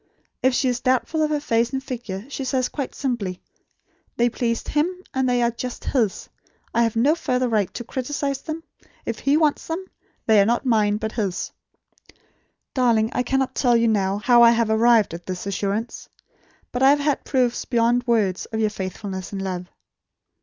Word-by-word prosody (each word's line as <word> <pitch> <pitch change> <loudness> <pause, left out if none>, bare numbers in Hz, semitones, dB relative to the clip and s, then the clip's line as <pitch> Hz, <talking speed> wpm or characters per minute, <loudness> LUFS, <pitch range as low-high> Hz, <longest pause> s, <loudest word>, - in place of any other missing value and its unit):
If 260 0 +3
she 265 - +2
is 245 -1 0
doubtful 260 +5 +1
of 305 - +2
her 300 -1 0
face 230 -4 +1
and 265 0 -2
figure, 230 -7 -6
she 275 -1 -5
says 255 -1 0
quite 275 -4 -5
simply: 220 -9 -2 0.8
'They 240 0 +3
pleased 230 -1 -2
HIM; 300 +4 +1 0.2
and 260 -1 +1
they 245 -1 +2
are 235 - +2
just 245 +1 -6
HIS. 225 -8 0 0.5
I 235 - +3
have 230 -1 +1
no 260 +7 +4
further 255 -6 0
right 210 -5 +1
to 240 - -4
criticise 275 +2 -3
them. 325 0 -6 0.4
If - - -3
he 280 +2 +2
wants 305 -2 +1
them, 335 +4 -3 0.4
they 215 -2 +5
are - - +4
not 235 +3 +1
mine, 210 -4 +2
but 220 0 -3
his.' 200 -6 -2 1.2
Darling, 235 -4 +2
I - - +1
cannot 265 0 0
tell 245 -3 +3
you 230 0 +3
now, 195 -2 +1
how 240 +3 +5
I 235 - +9
have 230 -1 +2
arrived 225 -3 +4
at 170 +1 -8
this 185 0 -4
assurance. 200 +3 -3 0.6
But 245 - -3
I 265 - +7
have 290 +1 +4
had 290 -1 0
proofs 250 -3 0
beyond 240 0 +1
words 205 -6 +1
of 220 - -4
your 215 -1 +1
faithfulness 190 -1 -5
and 200 - -4
love." 180 -2 -4
235 Hz, 190 wpm, -23 LUFS, 215-260 Hz, 1.2 s, I